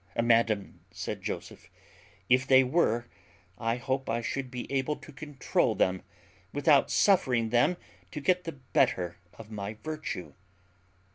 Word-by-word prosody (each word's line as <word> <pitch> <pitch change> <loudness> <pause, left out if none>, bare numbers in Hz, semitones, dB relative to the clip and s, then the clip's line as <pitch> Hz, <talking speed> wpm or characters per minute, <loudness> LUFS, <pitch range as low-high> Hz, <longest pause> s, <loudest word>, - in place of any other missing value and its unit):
"Madam," 115 -3 +2
said - - -5
Joseph, - - -6 0.6
"if 130 +2 +3
they 130 -1 +7
were, 125 -4 +1 0.5
I 115 +1 0
hope 130 +2 -2
I 115 +1 0
should 130 +2 -3
be 125 -1 -5
able 140 +2 0
to 150 - -13
controul 145 0 -1
them, 95 0 +1 0.5
without 145 0 +4
suffering 130 - +3
them 120 +9 +3 0.3
to 150 - -6
get 180 +5 +1
the 165 - -4
better 90 -9 0 0.2
of 110 -1 -11
my 105 0 -5
virtue." 155 - -5
130 Hz, 135 wpm, -29 LUFS, 115-145 Hz, 0.6 s, they